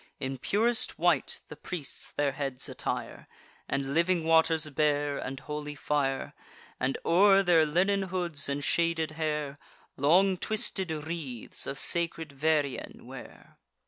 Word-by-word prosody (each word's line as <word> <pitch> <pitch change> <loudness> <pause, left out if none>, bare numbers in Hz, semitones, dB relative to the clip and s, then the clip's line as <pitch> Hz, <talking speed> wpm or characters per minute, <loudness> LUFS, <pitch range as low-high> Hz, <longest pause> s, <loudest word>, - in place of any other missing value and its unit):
In 135 0 -3
purest 225 - +1
white 170 -4 +1
the - - -9
priests 160 -2 -5
their 145 -1 0
heads 135 -2 -4
attire; - - -4 0.4
And 135 0 -1
living 170 +1 +2
waters 160 -1 +4
bear, 145 0 +1
and 135 0 -5
holy 150 0 -5
fire; 140 -2 -1 0.5
And, 130 +1 0
o'er 195 +3 +6
their 165 -4 +5
linen 190 +6 +2
hoods 170 -6 -2
and 140 +1 -2
shaded 165 0 +1
hair, 150 -2 -2 0.4
Long 180 +7 +4
twisted 195 -2 -1
wreaths 155 -6 -4
of 140 - -3
sacred 165 -2 0
vervain 145 -1 -1
wear. - - -12
155 Hz, 130 wpm, -29 LUFS, 140-170 Hz, 0.5 s, o'er